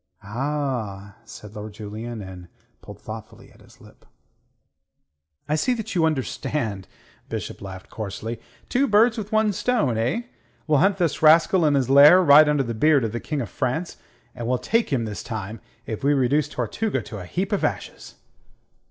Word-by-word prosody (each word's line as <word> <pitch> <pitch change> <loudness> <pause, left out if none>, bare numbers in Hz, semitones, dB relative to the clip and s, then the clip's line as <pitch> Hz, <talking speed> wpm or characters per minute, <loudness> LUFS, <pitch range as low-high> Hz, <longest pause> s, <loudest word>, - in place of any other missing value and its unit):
"Ah!" 115 -4 -4
said 105 -2 -11
Lord 105 0 -7
Julian, 110 +2 -7
and 95 -1 -10
he - - -23 0.3
pulled - - -12
thoughtfully - - -10
at - - -21
his - - -20
lip. - - -18 1.4
"I 150 - -1
see 245 +11 +1
that 220 -1 -5
you 170 -4 +2
understand," 130 - -2 0.4
Bishop - - -5
laughed 95 -1 -9
coarsely. 110 +2 -6 0.3
"Two 275 +3 +1
birds 220 +2 +4
with 215 -1 -6
one 215 -1 +2
stone, 180 - 0
eh? 125 - 0 0.4
We'll 150 -3 +3
hunt 195 +3 +3
this 165 -6 -1
rascal 165 +3 +5
in 145 - +3
his 135 -3 +1
lair, 145 +6 +8
right 150 -1 +7
under 145 -2 +2
the 120 -2 -4
beard 145 +4 +3
of 110 - -3
the 120 - -4
King 150 +1 -3
of 115 - -5
France, 160 +8 -2 0.4
and 120 -2 -6
we'll 125 +1 +1
take 225 - 0
him 120 -4 0
this 105 -2 -5
time, 110 -1 -6 0.2
if 110 +1 -6
we 145 +1 +3
reduce 140 +2 +1
Tortuga 160 - -2
to 105 - -8
a 90 - -8
heap 185 - -3
of 205 - 0
ashes." - - -4
135 Hz, 180 wpm, -23 LUFS, 110-165 Hz, 1.4 s, lair